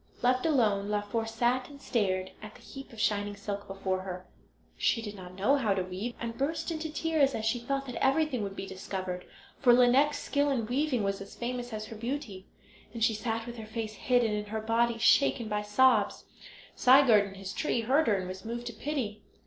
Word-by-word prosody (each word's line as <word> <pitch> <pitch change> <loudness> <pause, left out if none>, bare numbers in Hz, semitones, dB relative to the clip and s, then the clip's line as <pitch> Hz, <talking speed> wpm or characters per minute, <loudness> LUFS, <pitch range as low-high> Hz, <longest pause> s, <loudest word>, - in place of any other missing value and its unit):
Left 255 +4 +3
alone, 210 -9 +2
Laufer 210 +2 -1
sat 240 +3 0
and 285 -1 -12
stared 190 -8 -1
at 215 0 -10
the - - -15
heap 270 0 -10
of 225 - -11
shining 205 -1 0
silk 200 0 -5
before 190 -1 -2
her. 185 -1 -6 0.5
She 230 - +1
did 210 -2 -5
not 185 -2 -10
know 210 +10 +3
how 215 -7 +1
to 190 - 0
weave, 190 +6 -5
and 230 -1 -4
burst 290 +6 -2
into 315 -1 -4
tears 310 -3 +1
as 220 - -3
she 225 +2 +1
thought 275 +3 -2
that 250 - -4
everything 270 -2 +2
would 195 -1 -4
be - - -5
discovered, 185 -1 -5 0.3
for 245 -3 +6
Lineik's 255 +4 +5
skill 285 0 0
in 250 -5 0
weaving 255 0 0
was 195 0 -1
as 195 - -10
famous 245 0 -4
as 215 -1 -4
her 225 - -9
beauty. 230 -4 -5 0.5
As 230 - -1
she 225 - +4
sat 225 +1 -2
with 240 0 -8
her 220 -1 -8
face 220 -1 -4
hidden 240 0 +2
and 210 0 -3
her 220 +1 -3
body 230 +1 +1
shaken 235 0 +4
by 210 -1 -1
sobs, 210 0 +3 0.5
Sigurd 250 -6 +6
in 195 - -11
his 195 0 -6
tree 245 -2 0
heard 275 +8 +2
her 215 - +4
and 185 -1 -3
was 185 +1 -7
moved 235 +1 -5
to 240 - -5
pity. 225 -3 -3
225 Hz, 210 wpm, -30 LUFS, 205-255 Hz, 0.5 s, for